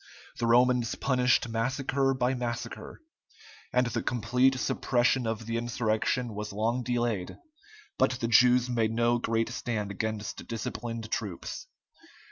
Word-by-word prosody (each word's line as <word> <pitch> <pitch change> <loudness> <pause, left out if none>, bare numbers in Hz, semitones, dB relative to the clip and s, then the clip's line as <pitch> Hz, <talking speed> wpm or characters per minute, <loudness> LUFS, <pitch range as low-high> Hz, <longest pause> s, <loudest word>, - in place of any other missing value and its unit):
The 115 - 0
Romans 120 0 +3
punished 125 -2 +2
massacre 135 +4 0
by 130 0 +1
massacre, 120 - -5 0.7
and 125 0 +3
the 115 -1 -2
complete 125 +3 +2
suppression 120 -1 +1
of 115 0 -3
the 115 +1 -2
insurrection 120 0 -1
was 105 +1 -5
long 115 +5 0
delayed, 120 -6 -2 0.6
but 130 0 +3
the 115 - -1
Jews 125 +2 +5
made 115 -3 +1
no 120 +1 +2
great 115 -1 0
stand 110 -4 -3
against 110 +2 -4
disciplined 115 0 -5
troops. - - -4
120 Hz, 125 wpm, -29 LUFS, 115-125 Hz, 0.7 s, Jews